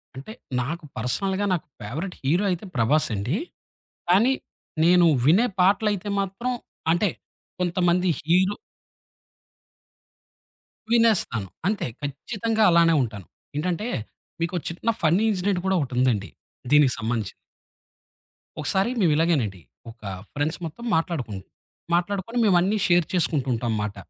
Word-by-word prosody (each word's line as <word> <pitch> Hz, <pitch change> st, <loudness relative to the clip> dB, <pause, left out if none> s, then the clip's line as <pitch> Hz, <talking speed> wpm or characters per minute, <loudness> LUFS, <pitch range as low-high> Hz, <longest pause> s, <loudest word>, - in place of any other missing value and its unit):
అంటే 140 Hz, +12 st, -8 dB, 0.3 s
నాకు 160 Hz, +7 st, -4 dB
పర్సనల్‌గా 190 Hz, -, -1 dB
నాకు 170 Hz, -, -2 dB
ఫేవరైట్ 155 Hz, -, -5 dB
హీరో 170 Hz, +9 st, +2 dB
అయితే 180 Hz, +3 st, -3 dB
ప్రభాస్ 135 Hz, +6 st, +3 dB
అండి. 120 Hz, -, -1 dB, 0.7 s
కానీ 215 Hz, +9 st, +5 dB, 0.5 s
నేను 175 Hz, +1 st, +6 dB, 0.2 s
వినే 190 Hz, -, +5 dB
పాటలయితే 205 Hz, +1 st, +2 dB
మాత్రం 195 Hz, +6 st, -2 dB, 0.4 s
అంటే, 175 Hz, +3 st, +2 dB, 0.5 s
కొంతమంది 180 Hz, 0 st, +1 dB
హీరో 185 Hz, +5 st, +2 dB, 2.4 s
వినేస్తాను 215 Hz, -, +3 dB, 0.2 s
అంతే 205 Hz, -8 st, 0 dB
ఖచ్చితంగా 215 Hz, -, -1 dB
అలానే 170 Hz, -1 st, +5 dB
ఉంటాను. 110 Hz, -6 st, -4 dB, 0.3 s
ఏంటంటే, 180 Hz, +7 st, -1 dB, 0.5 s
మీకొ 175 Hz, +2 st, -1 dB
చిన్న 175 Hz, +7 st, -3 dB
ఫన్నీ 170 Hz, +7 st, +3 dB
ఇన్సిడెంట్ 185 Hz, -1 st, 0 dB
కూడా 190 Hz, -, +2 dB
ఒకటి 130 Hz, -3 st, -3 dB
ఉందండి 110 Hz, -8 st, +1 dB, 0.4 s
దీనికి 145 Hz, -3 st, +6 dB
సంబంధించింది. 110 Hz, -3 st, -2 dB, 1.3 s
ఒకసారి 190 Hz, +8 st, +1 dB
మేము 170 Hz, -, +4 dB
ఇలాగేనండి 140 Hz, -, +1 dB, 0.3 s
ఒక 115 Hz, -, -21 dB, 0.3 s
ఫ్రెండ్స్ 150 Hz, +3 st, -1 dB
మొత్తం 160 Hz, +9 st, -8 dB
మాట్లాడుకున్నం. 135 Hz, -, -2 dB, 0.5 s
మాట్లాడుకొని 195 Hz, +6 st, -1 dB
మేమన్నీ 190 Hz, +2 st, +3 dB
షేర్ 175 Hz, -1 st, +4 dB
చేసుకుంటూ 155 Hz, -6 st, +1 dB
ఉంటాం 120 Hz, +1 st, -2 dB
అన్నమాట, 105 Hz, -2 st, -2 dB
170 Hz, 110 wpm, -24 LUFS, 135-195 Hz, 2.4 s, నేను